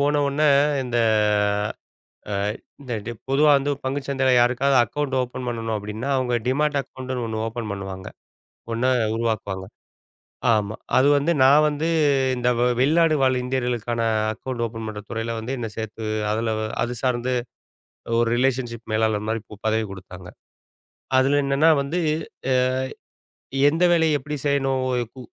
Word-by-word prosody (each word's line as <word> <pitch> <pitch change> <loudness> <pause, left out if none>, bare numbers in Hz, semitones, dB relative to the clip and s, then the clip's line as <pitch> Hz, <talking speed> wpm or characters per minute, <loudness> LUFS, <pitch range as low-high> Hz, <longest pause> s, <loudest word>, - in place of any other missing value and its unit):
போன 145 +1 +2
ஒடனே 150 +2 +2 0.4
இந்த 120 -1 -1 1.3
ஆ, - - -1 0.5
இந்த 130 -3 -7
டிப் 120 -2 -6
பொதுவா 150 +2 +4
வந்து 140 +1 0
ஒரு 140 - -6
பங்குச்சந்தையில் 135 -1 +1
யாருக்காவது 125 +3 +3
அக்கவுண்ட் 135 +3 -2
ஓபன் 125 0 -6
பண்ணணும் 115 -2 -3
அப்டினா, 105 +6 -4
அவங்க 125 -2 0
டீமேட் 145 +2 +1
அக்கவுண்ட் 130 -1 -9
ஒண்ணு 110 -1 -3
ஓபன் 115 -1 -5
பண்ணுவாங்க, 95 -1 -6 0.6
ஒண்ணா 120 +3 +1 0.3
உருவாக்குவாங்க. 110 -4 -2 0.9
ஆமா, 105 0 0 0.2
அது 130 - +5
வந்து. 150 +4 +1
நான் 145 +3 +6
வந்து 150 +2 -1 0.5
இந்த 125 0 +1 0.3
வெளிநாடு 160 +3 +4
வாழ் 130 -1 +3
இந்தியர்களுக்கான 120 -2 -2 0.3
அக்கவுண்ட் 120 +1 -4
ஓபன் 115 -1 -6
பண்ற 105 -1 -6
துறையில 115 0 -3
வந்து 125 +5 -4
என்னைச் 115 -3 -6
சேர்த்து, 110 0 -5 0.3
அதுல 110 0 -1 0.3
அது 120 +1 -3
சார்ந்து 125 0 0 0.9
ஒரு 120 - +2
ரிலேஷன்ஷிப் 120 -2 -1
மேலாளர் 110 -1 +1
மாரி 110 0 -1
பு 105 - -9
பதவி 110 0 +1
குடுத்தாங்க. 90 -1 -11 0.9
அதுல 140 +2 +3
என்னன்னா 140 +4 +4
வந்து, 160 +6 -2 0.5
ஏ 130 - +4 1.2
எந்த 165 +3 0
வேலையை 160 -2 +3
எப்டி 150 +3 -5
செய்யணும், 135 -2 +1
ஒரு 120 -1 0
கு 130 - -9
125 Hz, 140 wpm, -23 LUFS, 110-140 Hz, 1.3 s, நான்